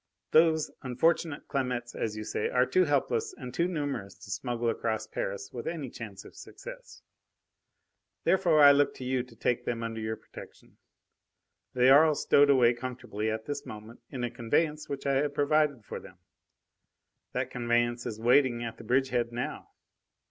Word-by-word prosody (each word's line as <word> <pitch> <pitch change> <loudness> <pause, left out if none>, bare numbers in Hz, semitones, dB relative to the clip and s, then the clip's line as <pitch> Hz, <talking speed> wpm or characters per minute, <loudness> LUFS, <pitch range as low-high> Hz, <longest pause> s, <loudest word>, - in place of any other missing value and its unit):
"Those 160 -1 +4
unfortunate 150 +4 0
Clamettes, 125 -3 -2
as 110 -1 -3
you 110 - -4
say, 105 - -2
are 125 0 +3
too 185 +7 +3
helpless 375 - 0
and 125 - -8
too 170 +5 +1
numerous 145 - -4
to 100 - -12
smuggle 120 -2 -2
across 110 -1 -1
Paris 100 -2 -5
with 120 - -6
any 155 -7 -4
chance 100 -4 -9
of - - -14
success. - - -11 1.2
Therefore 170 -5 +4
I 145 - +10
look 140 0 +3
to - - -8
you 130 0 0
to 125 -1 -13
take 120 +2 0
them 115 -1 -3
under 115 -1 -4
your 110 0 -2
protection. - - -14 1.0
They 125 +1 +5
are 145 +3 +8
all 155 -2 +3
stowed 145 0 +4
away 125 -4 +5
comfortably 120 -3 -4
at 110 0 -3
this 145 - -4
moment 110 +2 -10
in 125 -3 -5
a 120 - -2
conveyance 150 +6 -1
which 140 0 -5
I 140 -1 +2
have 145 +1 -1
provided 145 -5 +2
for - - -6
them. 95 -1 -14 1.2
That - - -2
conveyance 120 0 0
is 110 - -5
waiting 120 0 +3
at 115 -1 -6
the - - -9
bridgehead 125 0 +1
now. 120 +1 -5
125 Hz, 170 wpm, -29 LUFS, 115-145 Hz, 1.2 s, I